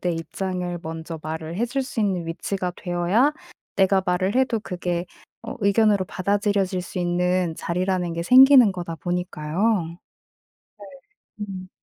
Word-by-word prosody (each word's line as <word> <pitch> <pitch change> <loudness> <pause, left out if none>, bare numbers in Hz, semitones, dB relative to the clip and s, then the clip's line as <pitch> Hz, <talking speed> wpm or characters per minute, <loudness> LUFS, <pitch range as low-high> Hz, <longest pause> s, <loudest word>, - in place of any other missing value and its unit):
내 180 - 0
입장을 180 +2 -4
먼저 160 0 -6
말을 160 +2 -5
해 235 - +1
줄 270 +3 -2
수 255 -3 -4
있는 185 -5 0
위치가 180 +2 -3
되어야 180 +11 +1 0.4
내가 190 0 +3
말을 185 +3 0
해도 255 -4 +1
그게 175 -2 -3 0.4
어 230 - -6
의견으로 200 -1 +3
받아들여질 200 -1 0
수 180 - -7
있는 180 -1 0
자리라는 180 0 -1
게 170 0 -3
생기는 255 +1 +7
거다 175 -2 -5
보니까요. 175 +2 -1 0.8
네. 200 - -11 0.6
음. 185 -1 -8
185 Hz, 285 characters per minute, -23 LUFS, 175-200 Hz, 0.8 s, 생기는